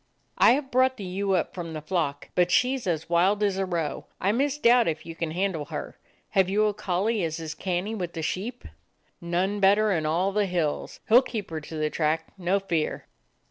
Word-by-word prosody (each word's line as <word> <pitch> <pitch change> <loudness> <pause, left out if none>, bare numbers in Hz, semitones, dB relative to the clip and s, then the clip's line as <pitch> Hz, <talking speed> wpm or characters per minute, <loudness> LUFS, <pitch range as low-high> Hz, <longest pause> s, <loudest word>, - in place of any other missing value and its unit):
"I - - +7
have 270 0 -2
brought 260 +1 +3
the 205 - -7
ewe 195 +2 -1
up 175 - -1
from 170 -3 -6
the 155 - -4
flock, 155 -3 -2
but 180 -1 +3
she 255 +8 +3
's 250 -6 -6
as 160 -3 -1
wild 185 +5 +2
as 195 -2 +1
a 190 - 0
roe. 170 -4 -3
I 195 - +2
misdoubt 250 -2 +3
if 155 -1 -2
you 165 - -7
can 165 -1 -3
handle 175 -2 -1
her. - - -7 0.3
Have 190 -3 +3
you 210 +2 +2
a 210 - +1
collie 200 +3 -1
as 160 0 -2
is 160 -1 -5
canny 185 +3 -2
with 180 -5 -4
the 160 - -4
sheep 215 +10 -3 0.3
?" - - -44 0.2
"None 180 +4 -1
better 205 +2 +4
in 160 -5 0
all 175 +5 +1
the 205 0 +1
hills. 170 -5 -2
He 220 - -1
'll 245 - +9
keep 220 -8 -5
her 160 -1 -4
to 160 - -9
the 155 -1 -1
track, 160 +1 0
no 190 +1 +1
fear." 170 -5 -2
185 Hz, 220 wpm, -26 LUFS, 165-210 Hz, 0.3 s, ll